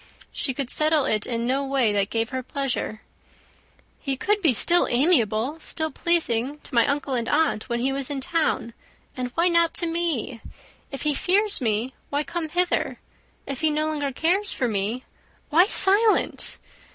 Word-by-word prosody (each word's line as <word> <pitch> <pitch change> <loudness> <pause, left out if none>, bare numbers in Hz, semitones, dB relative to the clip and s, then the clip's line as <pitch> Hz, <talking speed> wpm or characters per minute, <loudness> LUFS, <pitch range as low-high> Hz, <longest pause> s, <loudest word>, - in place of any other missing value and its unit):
She 265 - -3
could 275 -2 -3
settle 305 -2 +2
it 215 -1 0
in 235 -1 -2
no 265 +3 0
way 270 -6 +1
that 200 0 0
gave 225 +1 -1
her 260 -1 -3
pleasure. 255 -4 -3 1.0
"He 275 -3 -3
could 415 +8 0
be 320 -7 +4
still 340 - +4
amiable, 250 - +1
still 315 0 -1
pleasing 290 -6 0
to - - -12
my 235 -2 +4
uncle 280 -1 -2
and 235 -2 -1
aunt, 290 -8 0
when 235 0 -1
he 270 +2 0
was 275 -1 -1
in 285 -2 -3
town; 310 -5 -1 0.4
and 250 -1 -4
why 335 +2 +3
not 335 -1 +2
to 345 - +2
me? 330 -9 -2 0.5
If 275 - -6
he 300 -1 +1
fears 400 +7 +2
me, 230 +2 -1 0.2
why 290 +1 -1
come 320 +3 -4
hither? 355 +3 0 0.5
If 275 0 -5
he 315 - +3
no 305 +1 0
longer 295 -3 -2
cares 365 +9 +1
for 250 - -1
me, 215 +4 -2 0.5
why 345 +5 +5
silent? 420 +1 +3
275 Hz, 175 wpm, -24 LUFS, 245-330 Hz, 1.0 s, why